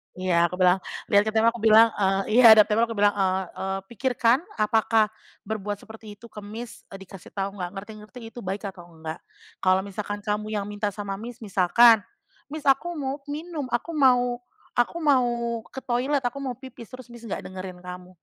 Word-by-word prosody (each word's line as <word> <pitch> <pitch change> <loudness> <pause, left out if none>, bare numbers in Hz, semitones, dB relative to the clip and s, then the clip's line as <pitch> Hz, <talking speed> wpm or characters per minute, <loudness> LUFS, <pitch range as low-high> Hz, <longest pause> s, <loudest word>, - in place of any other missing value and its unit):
iya, 180 -2 +2
aku 175 - -3
bilang, 180 0 +5 0.3
"Lihat 205 0 +6
ke 220 - 0
tembok," 230 +1 +3
aku 230 - -9
bilang, 225 +1 +7
eee 195 +4 +2
iya, 230 -3 +10
hadap 215 -1 +6
tembok 225 +2 +2
aku 230 - -4
bilang, 205 0 +3
eee 190 -1 +1 0.2
eee, 190 0 -2
"Pikirkan, 245 +2 +2 0.2
apakah 220 0 +3 0.4
berbuat 205 -1 -4
seperti 220 -1 -12
itu 235 - -12
ke - - -9
Miss, 225 +3 -9
eee, 195 - -9
dikasih 190 -2 -13
tahu 195 0 -3
nggak 175 0 -4
ngerti-ngerti, 215 +4 -10
itu - - -10
baik 195 +2 -4
atau 175 -3 -10 0.2
nggak? 160 +2 -5 0.4
Kalau 185 0 +4
misalkan 205 +1 -5
kamu 210 0 -2
yang 200 -1 -2
minta 205 0 -3
sama 200 0 -5
Miss, 235 +2 -9
misalkan 210 +4 +5 0.5
Miss, 310 -1 -6
aku 275 +6 +3
mau 275 -1 -3
minum, 310 -2 -5
aku 310 +7 -2
mau 245 -3 +3 0.3
aku 245 +7 0
mau 240 -6 +1
ke 265 - -8
toilet, 260 +3 0
aku 245 +3 -3
mau 255 -3 -4
pipis, 260 -4 -12
terus 255 0 -10
Miss, 235 - -12
nggak - - -5
dengerin 185 -1 -7
kamu, 180 0 -9
215 Hz, 190 wpm, -25 LUFS, 195-245 Hz, 0.5 s, iya